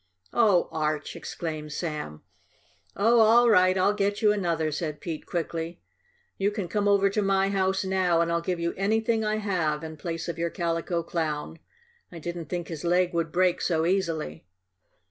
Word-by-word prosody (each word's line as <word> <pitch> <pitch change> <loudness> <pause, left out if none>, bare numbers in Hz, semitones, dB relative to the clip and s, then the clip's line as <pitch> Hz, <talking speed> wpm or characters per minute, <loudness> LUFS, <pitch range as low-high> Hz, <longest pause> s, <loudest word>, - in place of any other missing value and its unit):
"Oh, 210 -7 +4
Arch!" 155 -2 -2
exclaimed 155 -2 -5
Sam. 150 - -5 0.7
"Oh, 230 +4 +4
all 230 +2 +6
right. 185 -2 +5
I'll 195 +2 +3
get 205 0 0
you 210 -1 +4
another," 170 -6 0
said 150 0 -3
Pete 160 -3 -6
quickly. 165 0 -3 0.6
"You 200 +1 +2
can 205 -3 -4
come 205 +3 0
over 200 -1 +4
to 210 - 0
my 195 -1 +2
house 190 0 0
now, 185 -3 +2
and 170 0 +1
I'll 170 0 +1
give 175 0 -2
you 170 0 -1
anything 220 +3 +1
I 215 0 0
have 175 -8 -1
in 160 -1 -7
place 165 +1 -4
of 170 -1 -4
your 170 0 0
Calico 170 -1 -2
Clown. 160 -1 -3 0.5
I 175 - -9
didn't 170 +1 -5
think 175 +1 -4
his 160 -2 -6
leg 180 +1 +2
would 165 -1 -1
break 180 0 +2
so 160 -2 +1
easily." 165 - -1
175 Hz, 175 wpm, -27 LUFS, 165-195 Hz, 0.7 s, all